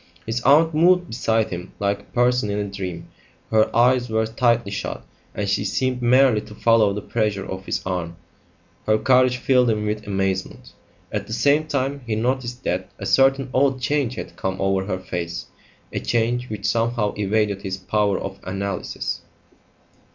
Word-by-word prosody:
His 115 +2 -2
aunt 160 +5 +5
moved 180 +2 +4
beside 115 -1 0
him 90 +1 -6
like 100 0 0
a - - -17
person 125 -2 +1
in 100 - -1
a 105 - -1
dream. 95 -4 -6 0.4
Her 110 -1 +4
eyes 125 +1 +4
were 110 0 +1
tightly 115 -1 +1
shut, 100 - -5 0.3
and 105 - -2
she 100 - +1
seemed 125 +5 -1
merely 125 -2 +4
to 105 0 -12
follow 115 -3 +4
the 105 +1 -4
pressure 105 -4 -1
of 95 +1 -7
his - - -2
arm. 90 -2 -3 0.7
Her 110 0 +4
courage 125 +1 +3
filled 125 -1 +3
him 105 -1 0
with 105 0 -3
amazement. 95 -1 -2 0.4
At - - -3
the 110 - -5
same 145 +5 +2
time 140 -1 -1
he 110 - 0
noticed 125 +2 -2
that 95 +1 -2
a - - -6
certain 135 0 +3
odd 135 0 +2
change 135 -2 0
had - - -7
come 95 0 -3
over 95 -1 +1
her 95 -2 -2
face, 85 -2 -5 0.5
a - - -1
change 120 +1 0
which 105 -2 -5
somehow 115 -1 +1
evaded 105 -1 0
his 95 -1 -4
power 100 +1 0
of 95 0 -6
analysis. 100 0 -4
110 Hz, 175 wpm, -22 LUFS, 100-125 Hz, 0.7 s, aunt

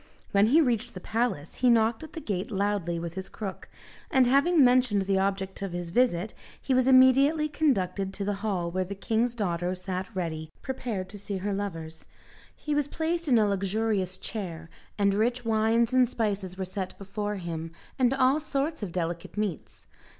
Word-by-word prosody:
When 200 +1 +4
he 300 +8 +5
reached 240 -4 0
the - - -5
palace 220 -7 -2
he 250 - +3
knocked 225 +2 +3
at 315 - -10
the - - -5
gate 200 - -3
loudly 200 -4 -1
with 170 0 -5
his 190 +1 -6
crook, 195 -3 -7 0.4
and 260 -1 +4
having 280 +5 +4
mentioned 245 -5 +4
the 190 0 +1
object 195 0 -2
of 195 -3 -4
his 175 -1 -4
visit, 215 -3 +1 0.3
he 265 - -1
was 255 0 +3
immediately 270 +4 +5
conducted 200 - 0
to 200 - -3
the 205 - 0
hall 185 -6 -1
where 185 +1 0
the 195 +2 -6
king's 225 +4 0
daughter 180 -4 -1
sat 185 0 -4
ready 160 -3 -3
prepared 235 -8 -3
to 205 - -9
see 200 0 -4
her 200 +2 -2
lovers. 165 -5 -5 0.5
He 300 - -3
was 290 -1 +1
placed 330 +2 -2
in 250 -4 +5
a 215 - +4
luxurious 200 -1 0
chair, 170 -6 -6 0.3
and 200 -1 +3
rich 235 +4 0
wines 225 +2 +2
and 255 -2 +4
spices 200 -6 -2
were 190 - -2
set 185 0 -5
before 205 +1 -4
him, 165 -3 -5 0.3
and 250 -1 +4
all 270 +2 +3
sorts 300 0 -2
of 200 -4 -4
delicate 170 +2 -4
meats. 210 -6 -4
205 Hz, 185 wpm, -27 LUFS, 185-250 Hz, 0.5 s, he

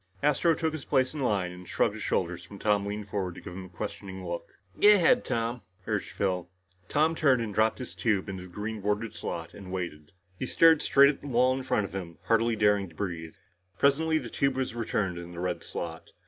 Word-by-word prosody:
Astro 150 +3 +3
took 160 0 -1
his 155 -3 -5
place 130 +1 +1
in 155 - -5
line 100 -8 +1
and 90 0 -11
shrugged - - +2
his - - -8
shoulders 85 0 -1
when 100 - -9
Tom 105 -1 +1
leaned 105 0 -4
forward 95 -4 -2
to - - -10
give 90 - -8
him 95 +1 -7
a - - -12
questioning 95 +2 -6
look. 85 0 -6 0.2
"Go 210 0 +9
ahead, 225 +7 +4
Tom," 115 +1 -2 0.2
urged 105 -3 -2
Phil. 90 -3 -1 0.4
Tom 155 +2 +3
turned 140 -6 +3
and 110 -3 -3
dropped 110 +2 +2
his 125 - -6
tube 105 -4 0
into 95 -2 -5
the 90 - -10
green 105 +3 -5
bordered 105 +2 -1
slot - - -5
and 95 -2 -10
waited. 85 -5 -5 0.3
He 130 - -2
stared 165 +1 +6
straight 140 0 +6
at 140 - -12
the 145 - -8
wall 125 0 +3
in 135 - -3
front 105 -5 0
of 95 - -9
him, 90 -4 -6
hardly 115 0 +2
daring 105 -3 +2
to 80 - -19
breathe. 80 -4 -4 0.4
Presently, 160 +5 +3
the 125 -6 -4
tube 140 -1 +1
was 130 -2 -1
returned 105 -6 -1
in 85 0 -9
the 85 - -7
red 90 0 -2
slot. 80 -1 -6
105 Hz, 225 wpm, -28 LUFS, 90-130 Hz, 0.4 s, Go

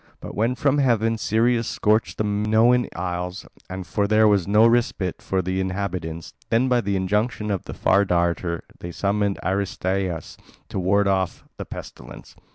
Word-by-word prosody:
But - - -8
when 115 +4 0
from 140 +2 +1
heaven 115 -4 +2
Sirius 115 +2 +1
scorched 110 +1 +1
the - - 0
Minoan 110 +4 +3
Isles, 90 +1 -4 0.2
and 95 0 -6
for 100 +2 0
long - - -1
there 110 +1 +4
was 100 -4 +2
no 105 +3 +5
respite 115 -6 +1
for 95 -1 -1
the 95 +1 -1
inhabitants, 90 -4 -4 0.2
then 120 +3 +2
by 125 -1 +2
the 100 -1 -1
injunction 105 +3 -1
of 95 - -3
the - - -7
Far 100 +2 +3
Darter 85 -2 0 0.2
they 85 - -7
summoned 100 +2 0
Aristaeus 95 -2 -2 0.3
to - - -3
ward 100 +2 +2
off 95 -2 0
the - - -6
pestilence. - - -10
100 Hz, 165 wpm, -23 LUFS, 95-110 Hz, 0.3 s, no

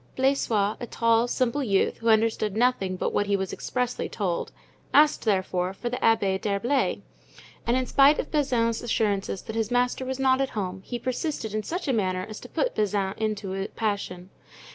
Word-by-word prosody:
Blaisois, 230 -6 +1
a 240 - -5
tall, 230 +1 +2
simple 255 +3 0
youth, 200 -7 +1
who 230 - -1
understood 220 -2 +2
nothing 225 -6 +1
but - - -2
what 205 - +1
he 200 - +2
was 190 -1 -3
expressly 250 -1 -2
told, 185 -5 -2 0.4
asked, 300 -2 +5
therefore 185 -3 0
for 240 +5 -4
the 250 - -2
Abbé 200 -4 +2
d'Herblay, 230 +7 0 0.6
and 240 +2 +3
in 260 - 0
spite 280 +3 +5
of - - -4
Bazin's 245 -6 +1
assurances 205 -5 -1
that 220 - -7
his 225 -1 0
master 245 +1 +1
was 260 0 -3
not 265 0 +3
at 270 - 0
home, 190 -1 -3
he 240 - -4
persisted 255 -2 -3
in 215 - 0
such 350 - -4
a 270 - +2
manner 185 -4 0
as 215 0 -8
to - - -11
put - - 0
Bazin 200 -2 0
into 210 -3 -2
a 195 +1 -2
passion. 200 -4 -3
225 Hz, 185 wpm, -26 LUFS, 200-250 Hz, 0.6 s, asked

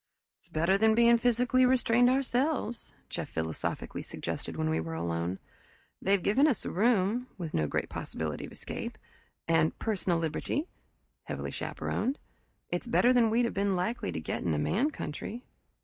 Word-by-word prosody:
"It's - - -19
better 170 +5 +2
than 220 0 +5
being 235 0 +6
physically 245 +2 +3
restrained 245 -1 +4
ourselves," 260 -2 0
Jeff - - -5
philosophically 80 0 -3
suggested - - -5
when 80 - 0
we 80 +1 +1
were 80 0 -4
alone. 85 +2 -2 0.6
"They've 195 -1 +2
given 265 +9 +4
us 265 -8 0
a - - -2
room 220 +3 +2
with 170 -4 -5
no 75 -1 +1
great - - -1
possibility 80 -2 -4
of - - -13
escape - - -5 0.5
and 165 -1 +3
personal 190 -5 0
liberty 165 - -2 0.6
heavily - - -4
chaperoned. 270 +4 -2 0.5
It's 175 +7 -3
better 245 +1 +4
than 240 -3 +4
we'd 235 +2 +3
have 235 - -2
been 200 -1 +1
likely 185 +7 -1
to - - -3
get 80 - -3
in 80 -3 0
a - - 0
man 210 - +1
country." 235 - -6
210 Hz, 165 wpm, -30 LUFS, 155-245 Hz, 0.6 s, being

